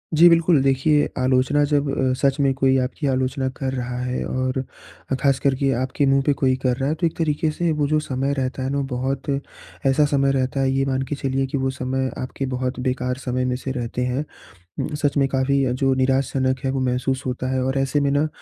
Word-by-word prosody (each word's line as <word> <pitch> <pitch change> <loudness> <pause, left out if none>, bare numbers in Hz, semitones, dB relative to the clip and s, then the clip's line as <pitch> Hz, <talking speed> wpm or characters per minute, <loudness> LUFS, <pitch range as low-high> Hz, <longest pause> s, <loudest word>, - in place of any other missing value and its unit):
जी, 165 +3 +8
बिल्कुल 165 -3 +4
देखिए, 140 +2 +3
आलोचना 130 +3 +2
जब 145 -1 +2
अ, 130 -1 +1
सच 140 0 +2
में 135 -1 +3
कोई 135 -1 +3
आपकी 140 +3 -3
आलोचना 130 0 0
कर 130 -1 -2
रहा 125 -1 -3
है 125 0 -2
और 130 0 -1 0.6
ख़ासकर 135 -1 +2
के 135 +1 +1
आपके 130 +2 0
मुँह 135 0 +3
पे 145 - +3
कोई 130 -2 +1
कर 125 -2 +2
रहा 135 +1 -1
है 155 - 0
तो 170 - 0
एक 160 - -6
तरीके 155 -1 0
से 170 +2 -1
वो 150 -2 0
जो 155 +1 +2
समय 135 -1 -2
रहता 130 -1 -2
है 130 - -1
ना 140 - -1
वो 140 - 0
बहुत 130 +2 -3 0.6
ऐसा 135 +2 +4
समय 140 -1 +3
रहता 135 0 -1
है 135 0 +2
ये 135 0 +1
मान 135 -1 0
के 145 - -1
चलिए 135 -1 -1
कि 135 - -2
वो 135 0 0
समय 130 0 -2
आपके 130 +1 -4
बहुत 130 0 -3
बेकार 125 0 -1
समय 125 0 0
में 125 0 0
से 130 +1 -4
रहते 125 -1 -3
हैं। 130 +4 -1 0.7
सच 145 -1 0
में 135 -1 +3
काफ़ी 135 -1 +1
जो 135 0 +2
निराश 130 0 +1
जनक 130 -1 +1
है - - +1
वो 135 - -1
महसूस 130 +1 -1
होता 130 0 -3
है 130 0 0
और 130 +1 -1
ऐसे 135 +2 +1
में 140 - +2
ना 145 +2 +2
135 Hz, 230 wpm, -22 LUFS, 130-140 Hz, 0.7 s, जी